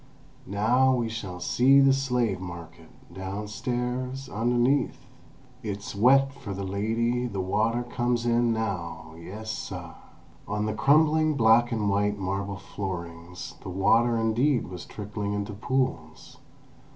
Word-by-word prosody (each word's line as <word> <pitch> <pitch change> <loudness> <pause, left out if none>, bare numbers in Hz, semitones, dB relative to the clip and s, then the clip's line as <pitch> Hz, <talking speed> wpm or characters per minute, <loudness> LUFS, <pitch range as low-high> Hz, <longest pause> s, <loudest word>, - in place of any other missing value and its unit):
"Now 125 +7 +3
we 120 -2 -1
shall 95 -5 -6
see 130 +9 +4
the 135 -1 +6
slave 125 -7 0
market—downstairs, 105 - -5
underneath! 120 +5 +1 0.6
It's 100 -3 -5
wet 135 +6 +5
for 100 -8 -7
the 100 - -4
lady 115 +5 0
the 100 -5 -5
water 110 +6 0
comes 120 -1 -1
in 120 0 +3
now 95 -7 -3
yes, 105 +6 -7
suh!" - - -6 0.5
On 105 +1 -1
the 110 - -1
crumbling 155 +5 +4
black 120 0 +5
and 110 -3 0
white 100 +1 +1
marble 100 +1 -3
floorings 90 -3 -6
the - - -7
water 115 +6 +3
indeed 115 +2 +1
was 90 -2 -8
trickling 105 -1 -5
into 105 +1 -3
pools. 110 -8 -3
110 Hz, 125 wpm, -27 LUFS, 100-125 Hz, 0.6 s, the